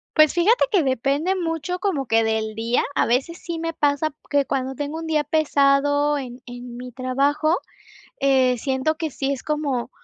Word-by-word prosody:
Pues, 310 -1 +6
fíjate 390 +8 +4
que 390 -5 +4
depende 275 +7 0
mucho, 335 -1 -2
como 345 -9 -1
que 225 0 +3
del 220 -1 -1
día. 230 +2 +1
A - - +3
veces 265 +8 0
sí 340 -2 -5
me 330 0 -3
pasa 290 +1 +1 0.2
que 285 -1 +3
cuando 265 0 -2
tengo 290 +3 -4
1 325 - -6
día 310 -2 +1
pesado 290 -1 +2
en 250 -2 -7
en 245 0 -8
mi 250 +1 -8
trabajo, 280 +6 +1 0.6
eh, 260 -2 +3
siento 265 +5 0
que 320 -1 -3
sí 270 0 -2
es 270 - -5
como 290 -5 -2
280 Hz, 180 wpm, -22 LUFS, 255-315 Hz, 0.6 s, Pues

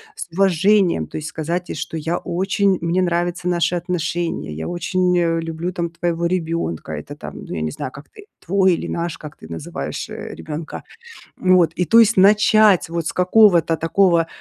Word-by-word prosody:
с - - -7
уважением, 190 - +2
то - - -7
есть 155 0 -5
сказать 170 +3 -4
ей, - - -4
что: 160 +1 -5
"Я 165 +3 -2
очень 190 +2 0
мне 170 +2 0
нравятся 175 0 -1
наши 175 0 +1
отношения, 170 - -3
я 80 +1 -5
очень, 180 +1 0
э, 165 -1 +1
люблю 165 +2 -4
там 170 -1 -2
твоего 170 0 -2
ребенка". 165 - -2
Это 75 - -7
там, - - -9
ну - - -8
я 80 - -3
не 80 0 -2
знаю, 130 - -6
как 140 +3 -13
ты, 415 - -15 0.2
"твой" 190 +1 +3
или - - -3
"наш", 170 0 -3
как 150 -1 -10
ты - - -13
называешь, 80 -2 -6
э, - - -7
ребенка. 155 +1 -7 0.6
Вот, 185 -3 +3
и 180 - 0
то 230 - +5
есть 230 0 +5
начать 210 0 +5
вот 170 -1 -3
с - - -1
какого-то 180 -3 +4
такого 170 0 +2
170 Hz, 185 wpm, -20 LUFS, 160-185 Hz, 0.6 s, то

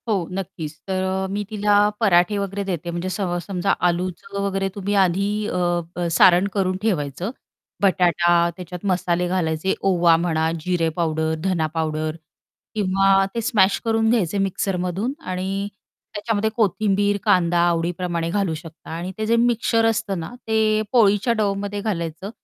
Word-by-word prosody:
हो, 195 -7 0
नक्कीच 165 -5 -6
तर 190 -1 -1
अ, 190 0 -1
मी 205 +1 -2
तिला 210 -1 +1 0.3
पराठे 195 -2 +3
वगैरे 200 0 -3
देते, 175 -3 -4
म्हणजे 175 +2 -3
स 185 +3 -4 0.3
समजा 195 0 0 0.2
आलूचं 180 +3 -4
वगैरे 195 0 -1
तुम्ही 200 0 -2
आधी 185 +3 0 0.2
अ, 175 -1 -1
सारण 180 +2 +6
करून 185 -2 0
ठेवायचं. 175 - -1 0.5
बटाटा 175 -3 +3 0.2
त्याच्यात 180 0 -8
मसाले 180 -2 0
घालायचे, 175 0 0 0.2
ओवा 170 -2 +4
म्हणा, 160 -1 0
जिरे 170 -1 0
पावडर, 160 -1 0
धना 180 -5 +1
पावडर 155 -1 -1 0.6
किंवा 195 -1 +3
ते 230 - 0
स्मॅश 205 -4 +3
करून 225 0 +2
घ्यायचे 205 -5 +1
मिक्सरमधून 195 +3 -1 0.2
आणि 190 +2 -2 0.5
त्याच्यामध्ये 215 0 -1
कोथिंबीर, 205 -2 +1
कांदा 175 -5 +3
आवडीप्रमाणे 170 0 -1
घालू 195 -2 0
शकता 160 0 -10
आणि 170 +3 -4
ते 215 - -2
जे 230 +2 +2
मिक्सचर 230 -1 +2
असतं 220 -4 0
ना, 160 - -5 0.2
ते 220 -1 +2
पोळीच्या 220 -1 +4
डोवमध्ये 205 -1 -1
घालायचं. 170 -3 -3
190 Hz, 140 wpm, -22 LUFS, 175-205 Hz, 0.6 s, सारण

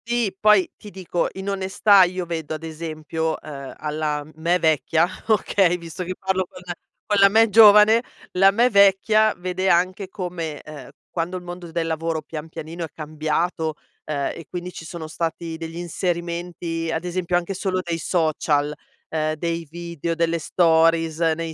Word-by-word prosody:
Sì, 235 -5 0
poi 210 -4 +5
ti 210 - -11
dico 185 -3 -2
in 190 +1 -7
onestà 195 +1 +4
io 180 0 -3
vedo, 160 -2 -4
ad 155 - -9
esempio, 160 0 -3
uhm, 140 -3 -8
alla 150 -1 -2
m 155 - -16
me 170 +3 +2
vecchia, 160 0 +2 0.2
okay, 195 -4 +3
visto 170 +1 -7
che 185 +1 -5
parlo 190 0 -1
con - - -12
la 175 - -4 0.3
con 205 -1 +1
la 195 - +8
me 225 +2 +4
giovane, 210 +1 +8 0.3
la 195 +1 +5
me 235 +5 +3
vecchia 200 +2 +5
vede 185 +1 -1
anche 185 +3 +2
come, 175 -6 -5
uhm, 145 -4 -10 0.2
quando 175 +2 -2
il 180 - -9
mondo 175 -1 -8
del 165 0 -1
lavoro 160 0 -2
pian 155 +1 -7
pianino 165 +1 -7
è - - -3
cambiato, 155 +1 -2 0.3
uhm, 145 -2 -2
e 165 - -10
quindi 180 0 -5
ci 165 - -9
sono 160 0 -7
stati 165 +1 -4
degli 165 0 -7
inserimenti, 170 -1 -3
ad 160 +1 -2
esempio, 180 0 0
anche 175 +2 -3
solo 185 0 -1
dei 170 -1 -3
social, 155 -3 0 0.4
uhm, 155 -1 -1
dei 165 +1 -3
video, 170 0 -4
delle 170 0 0
stories 165 -1 +3
nei 165 0 0
170 Hz, 170 wpm, -22 LUFS, 160-185 Hz, 0.4 s, la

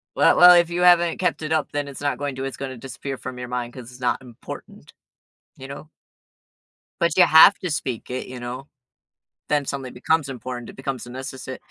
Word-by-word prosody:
Well - - +4
well 180 0 +9
if 170 -1 +4
you 175 +1 -2
haven't 175 -1 +5
kept 180 - 0
it 155 0 -3
up, 155 -3 0
then 145 -1 -2
it's 140 - -9
not 145 - -1
going 145 -1 -3
to 135 - -4
it's 135 - -5
gonna 135 -1 -5
disappear 135 +2 -7
from 130 -1 -8
your 125 0 -6
mind 125 -1 -4
'cause 125 -2 -10
it's 125 0 -15
not 125 -1 0
important. 125 -3 -11 0.6
You 135 - -10
know? 140 +2 -9 1.1
But 170 -2 +1
you 185 - +8
have 160 +5 +8
to 180 - -3
speak 130 -7 -4
it, 125 - -4
you 125 -1 -9
know? 125 +3 -7 0.8
Then 145 -1 +1
something 135 -2 -5
becomes 145 +3 0
important, 125 -1 -7
it - - -11
becomes 135 -1 -5
a - - -11
necessi 130 0 -7
135 Hz, 210 wpm, -23 LUFS, 125-155 Hz, 1.1 s, well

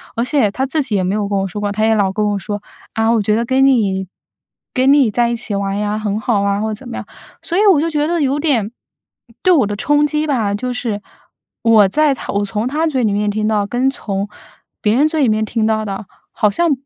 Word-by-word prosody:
而 235 +2 0
且 255 -6 +2
他 265 +5 -1
自 300 +3 -1
己 225 -6 -2
也 185 - +1
没 185 +2 0
有 205 -2 -1
跟 200 - 0
我 195 - -1
说 205 +3 -6
过， 205 -1 -1
他 215 +2 0
也 225 - +3
老 195 -2 +1
跟 210 +1 0
我 200 -1 -1
说： 205 +2 -5 0.3
“啊， 225 +1 +1
我 225 -2 +2
觉 210 +1 +1
得 235 +1 0
跟 265 +2 +2
你 195 -8 +2 0.7
跟 260 +1 +3
你 265 -7 +4
在 235 +2 +1
一 235 - -1
起 230 -2 -6
玩 200 0 -2
呀， 210 0 -1
很 210 0 -2
好 215 -2 0
啊。 200 0 0
“或 220 - -1
者 - - -2
怎 245 +4 -12
么 - - -6
样， - - -6 0.4
所 350 - -3
以 - - +4
我 300 - +3
就 330 - 0
觉 300 0 0
得 340 0 0
有 280 +1 +1
点， 240 -9 +1 0.7
对 370 - +5
我 260 -11 +3
的 205 - -3
冲 295 +6 +2
击 300 +1 -1
吧， 225 -8 0
就 250 +3 -3
是 220 -4 -3 0.6
我 220 -3 +5
在 300 +6 +2
他 - - -6
我 200 0 +1
从 215 +3 -2
他 310 +4 0
嘴 260 -5 0
里 205 -2 +1
面 210 0 0
听 215 +1 -1
到， 210 -2 +1
跟 250 +4 +1
从 200 -5 -4 0.5
别 210 +2 +2
人 295 +4 +4
嘴 310 -1 -1
里 235 - +3
面 215 0 +1
听 220 0 -1
到 215 -1 0
的， 200 +1 -5 0.3
好 210 - +2
像 335 +9 +1
220 Hz, 280 characters per minute, -17 LUFS, 205-265 Hz, 0.7 s, 对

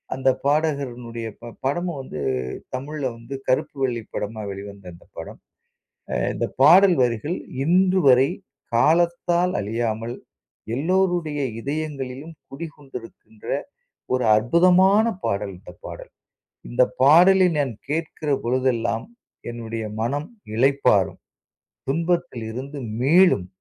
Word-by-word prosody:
அந்த 130 0 +2 0.2
பாடகரினுடைய 130 -6 -1
ப 120 0 -8
படமும் 170 +2 -1
வந்து 105 - -8 0.5
தமிழ்ல 140 +3 -5
வந்து 115 +4 -8
கருப்பு 130 +3 0
வெள்ளை 120 -4 -1
படமா 110 +1 -4
வெளிவந்த 100 0 -9
அந்த 85 - -17
படம். - - -8 1.0
இந்த - - -1
அ - - -43
பாடல் 180 +4 +7
வரிகள் 125 +7 -1 0.3
இன்று 185 +3 +3
வரை, 130 +1 +6 0.5
காலத்தால் 170 +5 +2
அழியாமல் 115 +2 -2 0.6
எல்லோருடைய 175 -1 0 0.2
இதயங்களிலும் 145 +1 -5 0.2
குடிகொண்டிருக்கின்ற 135 -7 -10 0.7
ஒரு 130 -1 +1
அற்புதமான 185 - +4 0.2
பாடல் 100 0 -2
இந்த - - -12
பாடல். - - -9 0.6
இந்த - - +1 0.2
பாடலினை 180 +5 +6
நான் 130 - -4 0.2
கேட்கிற 155 -1 -3
பொழுதெல்லாம் 120 -2 0 0.4
என்னுடைய 115 -1 -5 0.2
மனம் 145 +6 -2 0.3
இளைப்பாறும். 130 -6 +2 0.7
துன்பத்திலிருந்து 140 -5 -2 0.2
மீளும். 155 - +4
135 Hz, 100 wpm, -23 LUFS, 115-165 Hz, 1.0 s, பாடல்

